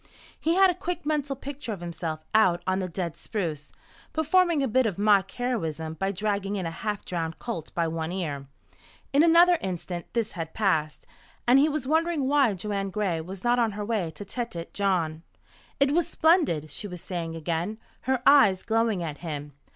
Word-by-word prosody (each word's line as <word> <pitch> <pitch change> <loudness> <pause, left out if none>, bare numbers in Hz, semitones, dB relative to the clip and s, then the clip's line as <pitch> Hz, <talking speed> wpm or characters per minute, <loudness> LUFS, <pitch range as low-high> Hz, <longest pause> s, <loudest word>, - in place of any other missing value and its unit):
He 330 +2 +1
had 380 -1 +6
a - - -3
quick 355 -1 -4
mental 290 -2 0
picture 275 -2 -6
of 200 - -4
himself 165 -2 -5
out 185 -6 +4
on 185 0 +1
the 185 -1 -3
dead 170 -1 -3
spruce, 160 -8 -4 0.4
performing 320 -1 +3
a - - +1
bit 255 +1 +3
of 200 - -3
mock 200 -2 +4
heroism 165 -12 -3
by 195 +4 -1
dragging 200 0 -1
in 190 -3 -2
a 165 - -2
half 210 +4 -4
drowned 165 -2 -3
colt 170 -10 -5
by 170 -1 +1
one 160 0 -3
ear. 150 -7 -4 0.7
In 280 - +6
another 340 +1 +6
instant 175 -2 -5
this 225 -2 0
had 165 -2 -6
passed, 160 -8 0 0.4
and 255 +3 +7
he 295 +3 +4
was 300 -3 -2
wondering 320 -2 +1
why 275 -7 +3
Joanne 195 +1 -2
Gray 190 -5 -1
was 185 +3 -8
not 240 0 +3
on 225 -3 +2
her 205 0 -4
way 205 -6 -1
to 205 - -7
Tête 200 -6 -5
Jaune. 175 -6 0 0.6
"It 275 0 +4
was 335 +2 +2
splendid!" 305 - +2
she 205 - -5
was 180 -3 -7
saying 165 -3 -4
again, 170 +6 -2 0.3
her 260 -1 0
eyes 205 -10 +6
glowing 225 -4 +1
at 150 -3 -5
him. 150 -4 -6
200 Hz, 190 wpm, -27 LUFS, 170-260 Hz, 0.7 s, and